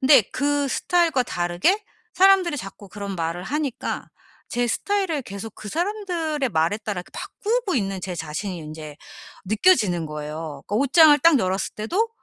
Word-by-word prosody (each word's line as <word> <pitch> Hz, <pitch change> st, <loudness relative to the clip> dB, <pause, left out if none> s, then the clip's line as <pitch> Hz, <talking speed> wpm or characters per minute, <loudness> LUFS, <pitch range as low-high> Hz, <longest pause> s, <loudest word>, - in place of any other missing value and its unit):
근데 265 Hz, -1 st, +7 dB
그 285 Hz, +1 st, +1 dB
스타일과 330 Hz, -2 st, +2 dB
다르게 175 Hz, -, 0 dB, 0.3 s
사람들이 375 Hz, -4 st, +5 dB
자꾸 195 Hz, 0 st, -9 dB
그런 200 Hz, -1 st, -6 dB
말을 165 Hz, +1 st, -2 dB
하니까 285 Hz, +1 st, -3 dB, 0.4 s
제 245 Hz, 0 st, 0 dB
스타일을 370 Hz, -, -1 dB
계속 200 Hz, 0 st, -8 dB
그 210 Hz, -, -9 dB
사람들의 340 Hz, -, -1 dB
말에 165 Hz, +4 st, +1 dB
따라 210 Hz, -5 st, -4 dB
그 -, -, -22 dB
바꾸고 450 Hz, -2 st, -2 dB
있는 195 Hz, -3 st, -1 dB
제 185 Hz, -1 st, -4 dB
자신이 170 Hz, +4 st, -4 dB
인제 155 Hz, -1 st, -8 dB, 0.5 s
느껴지는 210 Hz, -, +3 dB
거예요. 150 Hz, -1 st, -6 dB
그 205 Hz, -, -3 dB
옷장을 290 Hz, +4 st, +6 dB
딱 330 Hz, -4 st, +6 dB
열었을 190 Hz, -1 st, -1 dB
때도 365 Hz, -, 0 dB
225 Hz, 335 characters per minute, -23 LUFS, -, 0.5 s, 근데